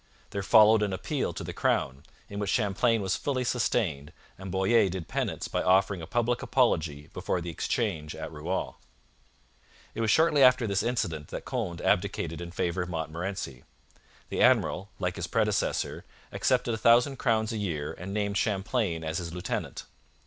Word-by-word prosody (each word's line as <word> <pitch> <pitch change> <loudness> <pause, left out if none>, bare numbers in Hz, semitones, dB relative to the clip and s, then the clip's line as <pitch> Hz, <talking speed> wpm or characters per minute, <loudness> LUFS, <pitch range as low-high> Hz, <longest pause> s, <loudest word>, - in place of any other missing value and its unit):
There 100 - -2
followed 110 +1 +6
an 100 -2 0
appeal 95 - -2
to - - -6
the - - -6
crown, 65 +1 0 0.3
in 100 - -6
which 100 -1 -2
Champlain 110 +1 +2
was 95 -1 0
fully 130 -3 -1
sustained, 100 - 0 0.2
and 95 0 -8
Boyer 95 +2 +3
did 90 -2 -5
penance - - -2
by - - -1
offering 95 0 +3
a 80 - -7
public 120 +3 0
apology 80 - 0
before 90 - -2
the 85 0 -5
Exchange 75 -1 -2
at - - -6
Rouen. 80 +5 -3 1.2
It - - -4
was 110 - +1
shortly 155 +3 +4
after 125 -2 +6
this 100 -1 0
incident 90 -11 -2
that - - -7
Conde 85 -1 -3
abdicated 85 +1 0
in 85 - -6
favour 85 +1 -1
of 90 - -4
Montmorency. 80 -4 -4 0.7
The - - -2
admiral, 100 +2 +3
like 90 0 -2
his 90 -1 -3
predecessor, 105 +1 0 0.3
accepted 125 -2 +1
a 110 - -3
thousand 120 +5 +4
crowns 110 -1 +1
a - - -2
year 80 -8 -3
and 90 +3 -7
named 100 -1 -1
Champlain 95 -4 0
as 80 0 -2
his 85 -2 -5
lieutenant. 90 +1 -4
95 Hz, 170 wpm, -28 LUFS, 85-115 Hz, 1.2 s, followed